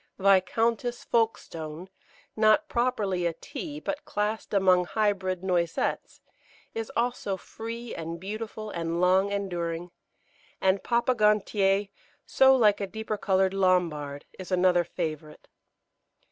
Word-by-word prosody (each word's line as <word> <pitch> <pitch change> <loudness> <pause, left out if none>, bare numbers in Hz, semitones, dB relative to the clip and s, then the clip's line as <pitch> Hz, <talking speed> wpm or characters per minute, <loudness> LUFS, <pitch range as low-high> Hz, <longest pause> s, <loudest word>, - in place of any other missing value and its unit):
Viscountess 225 +5 +2
Folkestone, 170 -7 -2 0.5
not 215 +8 +4
properly 205 - 0
a 170 - -2
Tea, 290 - -7
but 295 -1 -4
classed 210 +1 -2
among 185 -3 +4
Hybrid 190 -3 -1
Noisettes, 175 -3 -1 0.5
is 225 -1 -4
also 235 -5 -1
free 230 +4 -7
and 165 +1 -5
beautiful 215 +2 -6
and 170 0 -2
long 190 +2 +3
enduring; 175 -3 -3 0.7
and 190 +1 +2
Papa 240 +1 +2
Gontier, 205 -2 +2 0.4
so 265 0 +5
like 210 -5 +4
a 200 - -2
deeper 220 +1 -4
coloured 190 -2 +1
Lambard, 170 -7 0
is 185 0 -8
another 180 -1 +4
favourite. 155 -3 -6
195 Hz, 115 wpm, -27 LUFS, 180-220 Hz, 0.7 s, so